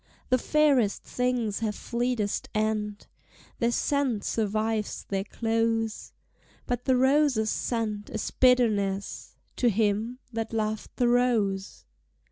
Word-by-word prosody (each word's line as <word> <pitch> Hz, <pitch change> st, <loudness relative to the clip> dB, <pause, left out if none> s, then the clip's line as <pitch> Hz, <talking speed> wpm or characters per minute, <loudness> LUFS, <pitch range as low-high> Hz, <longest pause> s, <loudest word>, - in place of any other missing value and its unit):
The 255 Hz, -, +3 dB
fairest 280 Hz, -8 st, +2 dB
things 250 Hz, -4 st, -1 dB
have 215 Hz, -2 st, -2 dB
fleetest 235 Hz, -3 st, -2 dB
end: 215 Hz, -1 st, -1 dB, 0.5 s
Their 235 Hz, -, +2 dB
scent 265 Hz, -5 st, 0 dB
survives 215 Hz, 0 st, -1 dB
their 195 Hz, -1 st, -1 dB
close, 225 Hz, 0 st, -1 dB, 0.5 s
But 245 Hz, 0 st, -3 dB
the 260 Hz, -, +3 dB
rose's 265 Hz, -4 st, +3 dB
scent 215 Hz, -3 st, -2 dB
is 220 Hz, -, -4 dB
bitterness 210 Hz, -6 st, +1 dB, 0.2 s
To 245 Hz, -, +3 dB
him 220 Hz, +3 st, 0 dB, 0.2 s
that 225 Hz, 0 st, -3 dB
loved 215 Hz, -1 st, -2 dB
the 245 Hz, -, +2 dB
rose! 225 Hz, -6 st, +1 dB
225 Hz, 110 wpm, -27 LUFS, 210-245 Hz, 0.5 s, The